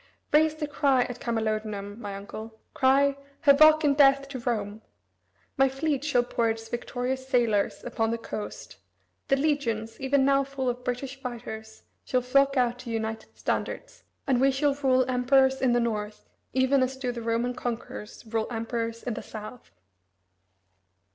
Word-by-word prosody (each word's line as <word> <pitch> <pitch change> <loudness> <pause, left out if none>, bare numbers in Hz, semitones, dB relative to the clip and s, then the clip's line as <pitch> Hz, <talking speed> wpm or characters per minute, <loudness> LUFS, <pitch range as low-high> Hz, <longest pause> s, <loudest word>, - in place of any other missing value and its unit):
Raise 310 +1 +4
the 310 -1 -3
cry 275 -3 +2
at 245 0 -7
Camalodunum, 215 -2 -2
my 205 -3 -6
uncle; 220 +3 -9
cry: 275 +1 +3 0.3
'Havoc 310 +2 +7
and 285 -2 +3
death 275 -1 +5
to 265 -2 -5
Rome!' 220 -3 -2 0.8
My 270 -1 +5
fleet 280 +1 -1
shall 265 -5 +2
pour 235 -1 0
its 225 0 -4
victorious 250 +2 -3
sailors 235 -6 +1
upon 225 -2 -1
the 230 - -1
coast; 215 -2 -7 0.5
the 275 - +4
legions, 235 -7 -1
even 270 0 +2
now 275 0 +4
full 270 -2 -3
of 245 +1 -4
British 260 +2 -4
fighters, 220 -3 -7 0.2
shall 255 - 0
flock 275 +2 +3
to 270 - +1
out 245 +1 -2
united 220 -1 -4
standards, - - -3 0.2
and 255 -3 +2
we 270 - +5
shall 275 +1 +1
rule 260 -2 +2
Emperors 265 +1 +3
in 255 -2 +3
the 240 - +3
North, 210 -3 -3 0.2
even 260 +1 +3
as 260 +1 -1
do 255 -2 -2
the 240 -1 -6
Roman 230 +2 0
conquerors 235 -3 -6
rule 220 0 -1
Emperors 230 0 -3
in 245 - -2
the - - -5
South." 215 +3 -9
250 Hz, 160 wpm, -27 LUFS, 225-275 Hz, 0.8 s, Havoc